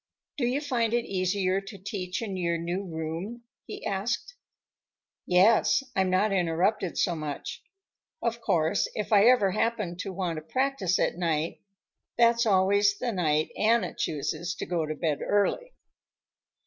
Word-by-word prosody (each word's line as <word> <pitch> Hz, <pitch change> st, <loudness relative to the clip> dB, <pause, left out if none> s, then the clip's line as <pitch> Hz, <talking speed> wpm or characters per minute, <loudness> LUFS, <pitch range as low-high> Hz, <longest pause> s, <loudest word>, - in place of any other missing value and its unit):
"Do 245 Hz, -4 st, +1 dB
you 265 Hz, +4 st, 0 dB
find 235 Hz, -5 st, 0 dB
it 240 Hz, -, 0 dB
easier 185 Hz, 0 st, 0 dB
to 200 Hz, +1 st, -10 dB
teach 190 Hz, +1 st, -4 dB
in 200 Hz, -4 st, -4 dB
your 170 Hz, -2 st, 0 dB
new 175 Hz, +4 st, -3 dB
room?" 170 Hz, +7 st, -5 dB, 0.2 s
he -, -, -8 dB
asked. 205 Hz, -, -2 dB, 0.9 s
"Yes; 210 Hz, +8 st, +4 dB
I'm 190 Hz, -1 st, +2 dB
not 195 Hz, +3 st, +2 dB
interrupted 185 Hz, +2 st, 0 dB
so 175 Hz, -, +2 dB
much. 150 Hz, -2 st, -5 dB, 0.6 s
Of 235 Hz, 0 st, -2 dB
course, 165 Hz, -2 st, +1 dB
if 215 Hz, +1 st, -2 dB
I 205 Hz, 0 st, +6 dB
ever 235 Hz, -6 st, +5 dB
happen 215 Hz, -3 st, -1 dB
to 190 Hz, -, -4 dB
want 180 Hz, -3 st, -3 dB
to -, -, -4 dB
practice 225 Hz, -, 0 dB
at -, -, 0 dB
night, 165 Hz, -2 st, -1 dB, 0.6 s
that's 235 Hz, 0 st, +4 dB
always 200 Hz, +1 st, +3 dB
the 245 Hz, +1 st, -2 dB
night 155 Hz, -6 st, 0 dB
Anna 220 Hz, -4 st, +2 dB
chooses 160 Hz, +4 st, -3 dB
to -, -, -5 dB
go 170 Hz, -3 st, -1 dB
to 155 Hz, -, -3 dB
bed 150 Hz, -4 st, -1 dB
early." 485 Hz, -, 0 dB
190 Hz, 150 wpm, -27 LUFS, 170-225 Hz, 0.9 s, I